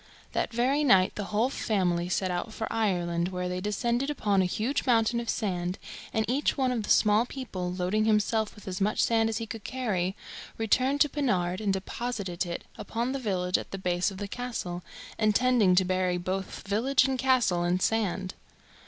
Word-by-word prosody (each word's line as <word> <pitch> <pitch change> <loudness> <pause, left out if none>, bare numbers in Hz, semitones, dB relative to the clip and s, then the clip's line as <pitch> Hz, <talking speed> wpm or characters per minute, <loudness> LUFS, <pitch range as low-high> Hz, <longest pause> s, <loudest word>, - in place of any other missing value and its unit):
That - - -1
very 260 +5 +2
night 190 -9 +5
the 205 - -4
whole 220 +6 +1
family 180 -8 0
set 185 0 0
out 180 +5 -3
for 220 - -3
Ireland, 175 -6 0
where 180 -1 -3
they 180 0 -3
descended 235 +6 0
upon 205 -9 +1
a - - +2
huge 220 +9 -1
mountain 235 -1 +3
of 235 - -5
sand, 180 -4 -1 0.3
and 220 0 0
each 270 +7 +1
one 260 -2 +2
of 240 -3 -1
the 205 - -7
small 215 +3 +4
people, 190 -11 -5
loading 185 +4 0
himself 215 0 +1
with 210 - -15
as 190 +1 -4
much 210 +2 +2
sand 225 -1 +2
as 220 - -2
he 225 - -3
could 220 -1 -7
carry, 195 -8 -1 0.4
returned 255 +6 +2
to 295 - +5
Pennard 190 -10 0
and 205 -2 +1
deposited 195 -2 -3
it 170 - -4 0.2
upon 235 +3 -2
the 275 - -2
village 185 -6 0
at - - -8
the 195 - -5
base 180 -1 0
of 195 - -9
the 205 +1 -4
castle, 200 -7 -4 0.4
intending 215 -2 +4
to 185 +1 +4
bury 185 -1 +1
both 190 +2 -4
village 250 +6 +3
and 265 -1 -1
castle 245 -10 +3
in 175 +1 +1
sand. 195 -3 0
210 Hz, 190 wpm, -28 LUFS, 185-235 Hz, 0.4 s, night